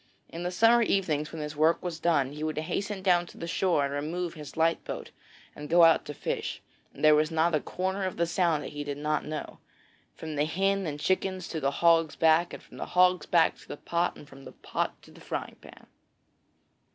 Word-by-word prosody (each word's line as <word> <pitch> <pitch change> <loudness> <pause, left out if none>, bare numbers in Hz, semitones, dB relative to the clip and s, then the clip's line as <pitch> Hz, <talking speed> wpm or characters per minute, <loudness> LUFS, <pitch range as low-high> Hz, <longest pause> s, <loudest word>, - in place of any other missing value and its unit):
In 165 - -7
the 175 - -2
summer 230 +6 +4
evenings, 160 -9 0
when 160 -2 -5
his 150 0 -6
work 160 +3 +2
was 175 -3 -4
done, 150 -6 +1
he 150 +1 -7
would 155 -1 -2
hasten 195 +5 -3
down 175 -2 +3
to - - -14
the - - -5
shore 170 -3 +1
and 140 - -4
remove 165 +4 -3
his 150 -2 -10
light 165 +1 +2
boat - - -7 0.4
and 150 0 -8
go 170 +1 +6
out 165 -1 +5
to 150 - -7
fish, - - -3 0.3
and - - -12
there 155 - +8
was 155 0 +3
not 160 +1 +1
a 155 - +3
corner 190 +5 -3
of 185 - -4
the 170 - +2
Sound 170 -3 +1
that - - -7
he 145 0 -4
did 145 -1 -5
not 150 +1 -1
know, 155 0 -6 0.6
from 155 -2 -6
the 145 - +2
Hen 195 +3 0
and 145 -1 -4
Chickens 185 +2 -1
to 160 - -3
the 140 -2 +1
Hog's 165 +1 +3
Back, 165 +2 +3
from - - -15
the - - -5
Hog's 180 0 +4
Back 170 -2 +3
to - - -17
the - - -7
Pot, 170 +3 -1
and 145 - -13
from 135 -1 -14
the 130 - -11
Pot - - -3
to - - -16
the - - -16
Frying - - -5
Pan. - - -15
165 Hz, 225 wpm, -28 LUFS, 150-180 Hz, 0.6 s, there